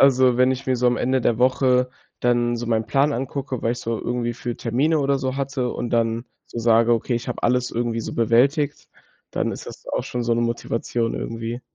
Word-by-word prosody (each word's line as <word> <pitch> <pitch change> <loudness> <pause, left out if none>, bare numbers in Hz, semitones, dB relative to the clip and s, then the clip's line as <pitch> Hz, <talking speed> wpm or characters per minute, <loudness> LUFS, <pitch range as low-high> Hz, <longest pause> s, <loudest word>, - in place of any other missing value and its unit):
Also, 130 -2 +5
wenn 130 +1 +4
ich 130 +1 -6
mir 130 -1 +2
so 125 +1 +1
am 120 -1 +3
Ende 130 +1 +1
der 115 -1 +1
Woche 125 0 +3 0.3
dann 120 0 +2
so 120 +1 -4
meinen 110 -1 0
Plan 140 +5 +2
angucke, 135 0 -3
was 115 - +1
ich 120 - -5
so 115 -1 -2
irgendwie 120 -1 -2
für 120 0 -5
Termine 145 +7 +1
oder 140 0 +1
so 130 0 -2
hatte 135 -2 -1
und 120 - -4
dann 115 0 +1 0.2
so 120 - -7
sage: 115 0 +4
„Okay, 120 +2 0
ich 120 - -5
habe 125 - -4
alles 125 0 +2
irgendwie 115 -1 -1
so - - -5
bewältigt", 140 +6 +2 0.4
dann - - 0
ist - - -7
das - - -10
auch - - -1
schon 125 -1 -3
so 115 - 0
‘ne 115 - +2
Motivation 115 0 -1
irgendwie. 115 +1 -4
120 Hz, 220 wpm, -23 LUFS, 115-130 Hz, 0.4 s, Also